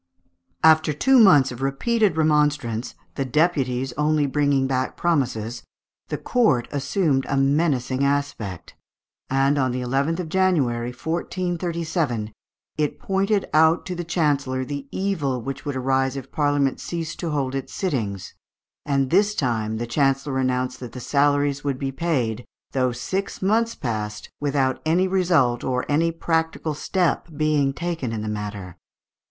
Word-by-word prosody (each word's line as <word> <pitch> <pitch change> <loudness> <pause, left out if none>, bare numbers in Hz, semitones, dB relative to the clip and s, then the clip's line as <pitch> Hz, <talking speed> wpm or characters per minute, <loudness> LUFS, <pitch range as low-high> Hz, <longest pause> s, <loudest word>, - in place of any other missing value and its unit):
After 160 -1 +5
two 265 - +4
months 145 - +6
of 120 +1 -8
repeated 190 - +1
remonstrance, 150 -7 +1 0.2
the 135 - -2
deputies 135 -3 0
only 150 0 +2
bringing 140 -1 +1
back 130 -1 -1
promises, 125 -9 -1 0.5
the - - -3
court 160 - +2
assumed 140 0 0
a 140 - +1
menacing 135 -2 +1
aspect; 140 - -2 0.6
and 135 +2 +2
on 130 -2 +1
the 125 +1 -2
11th 140 +7 0
of 170 - -6
January, 150 -11 +1
1437, 165 - -2 0.5
it 150 -2 0
pointed 195 +1 0
out 160 +2 +4
to 185 - -4
the 175 0 -4
chancellor 145 -6 0
the 140 0 -5
evil 155 -10 -1
which 135 +5 -6
would 145 -2 -3
arise 135 0 +1
if 135 0 -8
Parliament 145 -2 +1
ceased 165 -2 -5
to 170 - -2
hold 140 -3 -1
its 135 -1 -4
sittings; 110 - -3 0.5
and 140 -3 0
this 205 +3 +3
time 110 -4 -1
the 120 - -3
chancellor 135 +2 0
announced 130 0 -1
that 120 -3 -8
the 125 - -7
salaries 145 +1 +1
would 140 -2 -1
be 135 0 -3
paid, 130 -7 -1 0.3
though 130 -2 +1
six 190 +11 -3
months 225 +4 +2
passed 105 -3 -4
without 140 -2 0
any 175 +4 +2
resuit 170 -10 +2
or 125 -1 -1
any 165 +3 +2
practical 160 -1 -1
step 175 +4 0
being 150 -2 +2
taken 165 -4 -3
in 110 -2 -3
the - - -4
matter. 105 -4 -5
140 Hz, 145 wpm, -23 LUFS, 130-165 Hz, 0.6 s, months